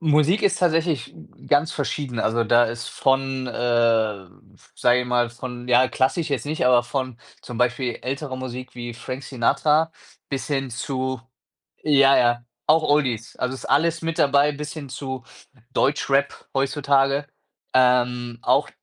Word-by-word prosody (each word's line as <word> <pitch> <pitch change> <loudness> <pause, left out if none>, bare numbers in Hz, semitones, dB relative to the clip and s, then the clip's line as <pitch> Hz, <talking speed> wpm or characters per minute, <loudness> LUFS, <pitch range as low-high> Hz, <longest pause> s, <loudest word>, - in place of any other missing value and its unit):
Musik 155 +4 +3
ist 195 -2 +2
tatsächlich 165 - 0
g 80 -2 -17
ganz 145 +2 +3
verschieden. 140 -4 -3
Also, 115 +2 +1
da 120 +2 +5
ist 120 +1 -5
von, 135 -1 0
äh, 115 -5 +1 0.5
sage 120 +1 +3
ich 125 - -4
mal, 120 -1 +1
von 125 0 -8
ja, 125 +1 +5
klassisch 140 +6 0
jetzt 130 -5 -1
nicht, 150 -3 0
aber 125 -1 +5
von 130 -1 -4 0.2
zum 120 - -8
Beispiel 125 0 0
ältere 135 +1 -4
Musik 130 0 -7
wie 120 -1 -6
Frank 130 +3 -6
Sinatra 150 +6 +1 0.4
bis 135 -2 -4
hin 135 -3 -1
zu 130 +1 -3 0.6
ja, 140 -2 +5
ja, 120 0 +2 0.2
auch 160 +1 +4
Oldies. 130 -7 0
Also, 125 +1 -2
ist - - -9
alles 165 +2 +1
mit 165 +1 -3
dabei 140 0 +4
bis 150 +1 -6
hin 150 -3 -7
zu 130 -1 -6 0.5
Deutschrap 140 0 0
heutzutage. 140 0 +1 0.5
Ähm, 125 -1 +2
auch - - +2
130 Hz, 150 wpm, -23 LUFS, 120-145 Hz, 0.6 s, da